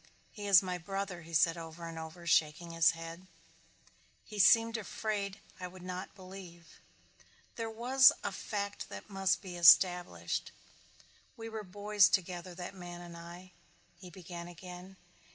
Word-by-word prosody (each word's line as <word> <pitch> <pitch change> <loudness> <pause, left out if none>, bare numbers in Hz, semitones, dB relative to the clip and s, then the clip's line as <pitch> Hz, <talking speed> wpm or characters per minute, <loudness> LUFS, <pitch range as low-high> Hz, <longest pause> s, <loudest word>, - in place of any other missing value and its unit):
"He 205 -2 -7
is 195 -2 +7
my 180 -1 -3
brother," 195 0 -4
he 165 0 -13
said 165 +3 +3
over 165 +1 -8
and 165 -1 -7
over, 160 +2 -9
shaking 170 0 +2
his 165 0 +4
head. 165 +2 -9 1.0
He 210 -1 -8
seemed 230 +3 +6
afraid 205 -1 -3 0.2
I 180 - -5
would 180 0 -13
not 185 +1 -6
believe. 185 -4 -12 0.8
There 225 -1 -3
was 250 +4 +6
a 200 - -2
fact 200 +1 -4
that - - -9
must 195 0 +1
be 180 -2 -7
established. 175 +1 +4 0.9
"We 225 0 -7
were 220 -1 -5
boys 205 +1 +3
together, 180 -1 -2
that 180 +2 -7
man 175 -2 -9
and 175 -1 -10
I," 175 +2 -11 0.5
he 180 - -11
began 175 -1 -9
again. 180 +2 -11
180 Hz, 150 wpm, -32 LUFS, 170-200 Hz, 1.0 s, is